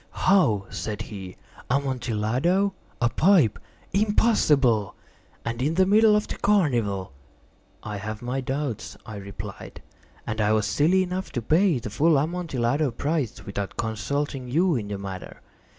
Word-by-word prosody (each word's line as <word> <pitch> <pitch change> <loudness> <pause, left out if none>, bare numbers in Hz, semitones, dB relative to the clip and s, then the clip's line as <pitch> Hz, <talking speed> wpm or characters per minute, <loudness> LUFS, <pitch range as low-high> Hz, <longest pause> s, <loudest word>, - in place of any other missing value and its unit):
"How?" 120 - +3
said 105 +2 -4
he. 95 -4 -9 0.3
"Amontillado? 130 - 0 0.3
A 115 - +3
pipe? 155 - +3 0.3
Impossible! 150 - +3 0.5
And 115 +1 -3
in 150 +5 +1
the 190 +1 +4
middle 210 +2 +5
of 210 - 0
the - - -5
carnival!" 120 - +1 0.7
"I 105 -1 -5
have 110 +3 -6
my 125 +2 -2
doubts," 135 -3 -4
I 110 -2 -7
replied; 100 0 -8 0.5
"and 110 0 -2
I 105 +1 +3
was 110 -1 +2
silly 165 - +3
enough 185 +1 -4
to 120 - -1
pay 165 - +3
the 115 -3 -6
full 155 +7 +3
Amontillado 145 -3 0
price 130 - -2
without 100 -1 -5
consulting 125 +5 -2
you 170 +5 +2
in 110 -5 -3
the 100 -1 -4
matter. 95 -2 -7
125 Hz, 140 wpm, -25 LUFS, 105-170 Hz, 0.7 s, middle